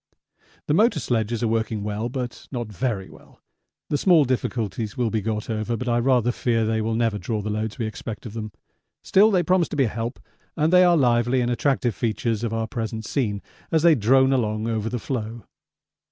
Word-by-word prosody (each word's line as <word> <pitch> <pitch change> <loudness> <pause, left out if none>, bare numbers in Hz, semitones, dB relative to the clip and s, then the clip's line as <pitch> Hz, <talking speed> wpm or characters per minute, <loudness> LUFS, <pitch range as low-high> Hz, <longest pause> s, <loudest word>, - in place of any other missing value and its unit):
The - - 0
motor 210 0 +3
sledges 115 -2 -1
are - - +2
working 110 -1 -1
well, 105 +3 -3
but 125 -1 -5
not 120 -4 -4
very 100 -1 -2
well; - - -18 0.5
the 145 - +1
small 170 -4 +5
difficulties 115 -4 -2
will 120 -3 0
be 110 - 0
got 105 0 -3
over, 110 +1 -2
but 125 - -5
I 120 0 +2
rather 125 -1 +2
fear 115 -2 0
they 110 0 0
will 110 +1 -1
never 115 -3 0
draw 110 0 -2
the 105 - -3
loads 110 +2 -3
we 115 - -2
expect 110 +1 -6
of 110 - -7
them. 110 -1 -5 0.5
Still 205 +3 +5
they 185 -4 +2
promise 180 0 +2
to - - -5
be 140 - +3
a - - +2
help, 115 +4 -4 0.4
and 160 +2 +2
they 180 0 +7
are 175 -1 +5
lively 120 -1 +2
and 120 0 0
attractive 125 -1 +1
features 115 +1 -1
of 115 - -1
our 115 0 -1
present 110 -1 -4
scene 105 -6 -2 0.3
as 160 -1 +2
they 170 -1 +7
drone 130 +2 +4
along 110 -3 0
over 110 -1 -1
the 125 - -2
floe. 115 -2 -4
115 Hz, 210 wpm, -24 LUFS, 110-130 Hz, 0.5 s, they